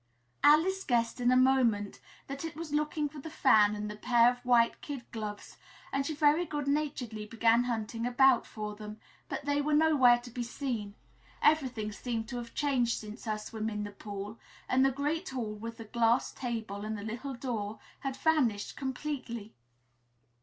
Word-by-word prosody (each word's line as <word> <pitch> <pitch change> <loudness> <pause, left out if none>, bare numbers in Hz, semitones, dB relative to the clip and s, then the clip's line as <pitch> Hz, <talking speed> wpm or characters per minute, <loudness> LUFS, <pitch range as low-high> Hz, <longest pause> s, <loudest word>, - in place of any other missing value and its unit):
Alice 360 +6 +5
guessed 235 0 0
in 245 - +3
a - - +5
moment 250 -6 +3 0.3
that 275 +2 -6
it 325 -2 -5
was 315 -2 -6
looking 300 0 0
for 295 +1 -10
the 320 - -7
fan 215 -9 +4
and 210 0 -4
the 210 - -6
pair 240 +2 +4
of 245 0 -10
white 240 -2 +3
kid 280 -4 -6
gloves 210 -2 -6 0.4
and 275 0 0
she 310 - -3
very 300 +3 +4
good 295 -4 -4
naturedly 275 -7 -2
began 230 +2 +3
hunting 230 0 -2
about 260 0 +4
for 210 -1 -5
them, 210 0 -9 0.3
but - - -4
they 285 0 +1
were 300 +1 +1
nowhere 295 -6 +6
to 240 0 -11
be 245 - -4
seen 230 -4 -4 0.4
everything 255 -9 +2
seemed 225 +1 -4
to 245 - -5
have 235 -1 -7
changed 255 -5 +1
since 215 +3 -9
her 215 -1 -1
swim 215 +1 -4
in 210 -1 -3
the 205 - -6
pool, 205 +1 -7 0.3
and 260 +1 +3
the 270 - +5
great 295 +7 -2
hall, 235 -5 -3
with 230 +2 -7
the 225 - -8
glass 235 +2 +2
table 225 -5 -4
and 215 0 -3
the 205 - -7
little 240 +5 -5
door, 220 -4 -4 0.2
had 270 -1 -4
vanished 255 -11 +1
completely. 260 -5 -4
245 Hz, 180 wpm, -31 LUFS, 220-280 Hz, 0.4 s, nowhere